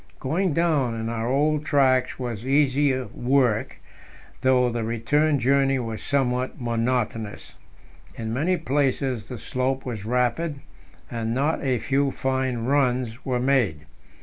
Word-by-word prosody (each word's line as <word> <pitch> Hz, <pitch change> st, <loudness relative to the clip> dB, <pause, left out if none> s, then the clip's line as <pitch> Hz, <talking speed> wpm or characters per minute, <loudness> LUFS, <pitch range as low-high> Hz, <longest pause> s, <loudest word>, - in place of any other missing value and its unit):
Going 175 Hz, +7 st, 0 dB
down 150 Hz, -8 st, +1 dB
in 115 Hz, 0 st, -3 dB
our 115 Hz, 0 st, -2 dB
old 150 Hz, +3 st, +1 dB
tracks 130 Hz, -4 st, +2 dB
was 120 Hz, -4 st, -4 dB
easier 135 Hz, -1 st, +2 dB
work, 125 Hz, -3 st, +1 dB, 0.6 s
though 125 Hz, -1 st, +3 dB
the 115 Hz, -1 st, -2 dB
return 145 Hz, +7 st, +1 dB
journey 135 Hz, +1 st, +2 dB
was 115 Hz, -3 st, -4 dB
somewhat 130 Hz, -2 st, -1 dB
monotonous. 115 Hz, -2 st, -2 dB, 0.6 s
In 110 Hz, -1 st, -4 dB
many 170 Hz, +9 st, +1 dB
places 135 Hz, -, -1 dB
the 125 Hz, -, -5 dB
slope 130 Hz, +4 st, -2 dB
was 115 Hz, -5 st, -5 dB
rapid, 125 Hz, +7 st, 0 dB, 0.6 s
and 115 Hz, 0 st, -2 dB
not 145 Hz, +5 st, 0 dB
a 130 Hz, -3 st, +1 dB
few 140 Hz, +4 st, +1 dB
fine 130 Hz, -3 st, -1 dB
runs 125 Hz, -3 st, 0 dB
were 125 Hz, -2 st, 0 dB
made. 120 Hz, -, +1 dB
130 Hz, 130 wpm, -24 LUFS, 120-140 Hz, 0.6 s, though